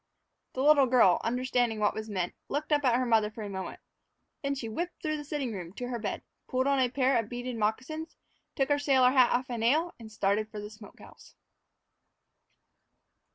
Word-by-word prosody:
The 260 - -2
little 290 -2 +6
girl, 235 -8 +5
understanding 245 -2 0
what 210 -1 +2
was 220 0 -6
meant, 185 -4 -2 0.2
looked 300 +2 -3
up 295 -1 +3
at 250 -3 +4
her 255 +1 +1
mother 220 -3 +3
for 215 0 -8
a 205 - -5
moment. 190 -1 -6 0.6
Then 280 0 -1
she 255 -4 -5
whipped 340 +11 -4
through 310 -1 -2
the 295 - -6
sitting 285 -5 -3
room 180 -3 -7
to 245 +3 -5
her 240 -2 -3
bed, - - -4 0.2
pulled 260 0 0
on 280 -1 +2
a 255 -1 +3
pair 260 -1 +2
of 225 -2 -4
beaded 245 0 -5
moccasins, 255 +9 -2 0.4
took 270 -1 0
her 290 0 +3
sailor 265 -3 +4
hat 255 -2 +5
off 255 +1 0
a 235 - -3
nail, 305 +10 +2
and 220 -1 -11
started 210 +1 0
for 215 -2 -7
the 210 +1 -7
smoke 210 -1 -14
house. - - -16
245 Hz, 200 wpm, -29 LUFS, 220-275 Hz, 0.6 s, little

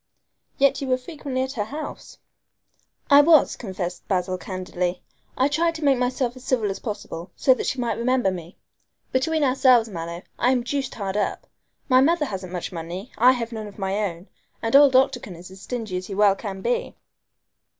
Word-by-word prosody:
"Yet 275 0 +3
you 275 - -3
were 255 -1 +2
frequently 260 -1 -4
at 260 - -4
her 215 -6 -3
house." 300 +7 -8 0.9
"I 285 +1 +9
was," 310 -1 +5
confessed 185 -5 -5
Basil 185 -1 0
candidly. 180 0 -4 0.3
"I 260 - +3
tried 330 +3 +1
to 315 - -6
make 275 -3 +3
myself 250 0 -1
as 255 - -12
civil 230 -7 0
as 195 - -6
possible, 205 -6 -6
so 260 - +4
that - - -4
she - - -1
might 235 -3 -1
remember 250 -4 +2
me. 175 -1 -8 0.5
Between 310 +4 +1
ourselves, 255 -3 +4
Mallow, 170 -1 -6 0.2
I 245 - +3
am 250 -2 +1
deuced 275 +1 -3
hard 200 -2 -3
up. 210 - -2 0.4
My 255 -1 +5
mother 315 +2 +3
hasn't 190 -6 -6
much 180 -2 -4
money, 175 +6 -6
I 250 +3 +7
have 235 -2 -4
none 220 -2 -5
of 205 - -13
my 195 -1 -2
own, 170 +3 -12 0.3
and 225 +2 0
old 280 -2 +7
Octagon 255 -7 +2
is 175 +2 -12
as 190 0 -13
stingy 220 -7 -4
as 185 - -6
he 195 - -5
well 205 -1 +4
can 195 -2 -6
be." 240 +1 -1
235 Hz, 190 wpm, -24 LUFS, 190-260 Hz, 0.9 s, I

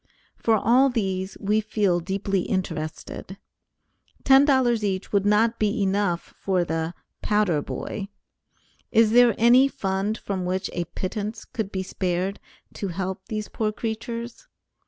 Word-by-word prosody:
For 225 - +2
all 250 +6 +4
these, 190 -5 -2
we 210 +2 +1
feel 205 -4 +1
deeply 195 +2 -1
interested; 175 +1 -4 0.9
$10 265 -4 +5
each 195 -1 -2
would 200 0 +2
not 225 +3 +3
be 210 0 +1
enough 190 -3 0
for 185 -2 +1
the 165 +1 -2 0.3
"powder 210 -8 +2
boy." 195 +6 -5 0.8
Is 225 -1 +5
there 240 0 +6
any 245 +4 +6
fund 195 -2 -2
from 190 -3 -4
which 185 +1 -2
a 175 - -2
pittance 210 +5 -5
could 215 -4 -4
be 190 -1 -2
spared 185 +1 -2 0.3
to 200 - -4
help 190 +1 -4
these 215 -2 -3
poor 215 -1 -1
creatures? 230 - -5
205 Hz, 135 wpm, -24 LUFS, 190-225 Hz, 0.9 s, there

